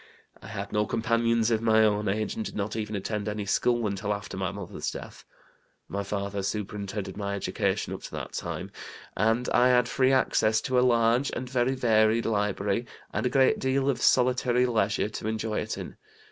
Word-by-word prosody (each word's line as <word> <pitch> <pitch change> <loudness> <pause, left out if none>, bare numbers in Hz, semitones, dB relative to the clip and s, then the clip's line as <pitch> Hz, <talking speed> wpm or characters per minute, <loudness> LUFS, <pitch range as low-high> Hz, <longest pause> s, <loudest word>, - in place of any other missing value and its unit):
I - - -11
had - - -6
no 105 0 +1
companions 115 0 +1
of 110 -1 +2
my 110 -1 +4
own 105 -1 +2
age, 105 +2 -1
and 110 - -3
did - - -7
not 105 +1 -2
even 105 -1 -3
attend 105 +1 -3
any 105 -1 -3
school 120 +3 +1
until 105 0 -1
after 100 -1 -8
my 95 0 -2
mother's 100 -2 -5
death. - - -9 0.6
My 100 - -3
father 100 0 -3
superintended 100 0 -4
my 100 -1 -2
education 100 - -1
up - - -7
to - - -9
that - - -5
time, - - -5 0.4
and 115 +3 +1
I 125 +1 +4
had 125 -1 +4
free 130 +1 +2
access 110 -4 +3
to 130 0 +1
a - - +4
large 120 +1 +3
and 125 +1 -4
very 125 +1 +1
varied 110 -2 +3
library, 105 +1 0 0.3
and - - 0
a - - 0
great 130 0 +3
deal 135 +1 +1
of 130 - -5
solitary 125 0 +3
leisure 105 -4 +1
to 110 - -5
enjoy 110 0 -1
it - - -4
in. - - -8
110 Hz, 190 wpm, -27 LUFS, 105-120 Hz, 0.6 s, my